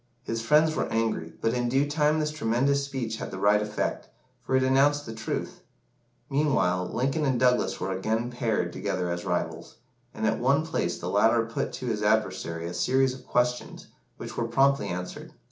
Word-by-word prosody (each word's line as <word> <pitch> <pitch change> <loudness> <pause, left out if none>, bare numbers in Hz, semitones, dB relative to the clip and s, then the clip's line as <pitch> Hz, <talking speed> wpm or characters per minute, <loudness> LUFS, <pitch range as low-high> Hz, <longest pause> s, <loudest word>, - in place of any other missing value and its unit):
His 115 0 -3
friends 155 +6 +4
were - - -2
angry, 110 -8 -1
but 115 - +1
in 120 -1 0
due 135 +3 +2
time 150 +1 +2
this 150 0 0
tremendous 140 0 +1
speech 130 -5 -4
had - - -5
the 95 - -6
right 105 +2 +3
effect, 105 0 -3 0.3
for 125 +2 -1
it 130 - +3
announced 140 +2 +3
the 115 - -6
truth. 110 0 -4 0.7
Meanwhile, 95 -11 +1
Lincoln 135 +5 0
and 130 -4 +1
Douglas 125 0 +2
were 95 - -2
again 110 +5 -1
paired 110 -8 -1
together 95 -3 -2
as 85 +2 -4
rivals, 90 -2 -3 0.4
and 110 - -4
at 110 0 +1
one 140 +6 +2
place 85 - -1
the 85 - -6
latter 115 +4 +3
put 115 - -3
to 130 - -6
his 110 -3 -1
adversary 95 -6 0
a 85 - -4
series 130 +9 +2
of 130 - -13
questions, 125 0 -1 0.3
which - - -7
were 115 - -1
promptly 135 +4 +3
answered. 90 +1 -6
115 Hz, 185 wpm, -27 LUFS, 105-135 Hz, 0.7 s, friends